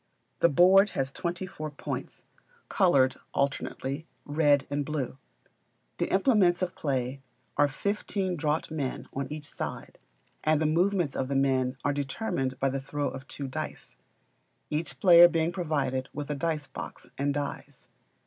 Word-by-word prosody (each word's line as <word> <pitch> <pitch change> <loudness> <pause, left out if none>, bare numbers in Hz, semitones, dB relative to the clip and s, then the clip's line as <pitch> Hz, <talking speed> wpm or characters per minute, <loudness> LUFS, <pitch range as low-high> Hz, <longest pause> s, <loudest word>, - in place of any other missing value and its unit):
The 170 - +5
board 190 +7 +6
has 135 0 0
twenty 175 +4 -3
four 155 -4 -6
points, 145 - -6 0.4
coloured 135 -9 +4 0.2
alternately 140 +2 -2 0.2
red 145 -2 +3
and 145 0 -1
blue; 140 -3 -3 0.8
the - - -1
implements 190 -4 +4
of 180 - -2
play 135 -2 -2 0.3
are 145 - +4
fifteen 195 +3 -2
draught 155 0 -1
men 145 -5 -3
on 140 0 -2
each 150 -1 -6
side, - - -6 0.4
and 155 -1 +3
the 155 - +1
movements 175 -1 +2
of 130 - -1
the 140 - -2
men 130 -1 +2
are 145 - +2
determined 135 - -2
by 135 - +2
the 135 0 -2
throw 145 +1 -2
of 135 0 -9
two 140 - -5
dice; 155 +4 -6 0.8
each 150 -4 -3
player 175 0 +9
being 165 -1 0
provided 140 -7 -1
with 150 0 -4
a - - -1
dice 155 0 -1
box - - -8
and 140 +1 0
dies. 145 -1 -5
145 Hz, 150 wpm, -28 LUFS, 135-170 Hz, 0.8 s, player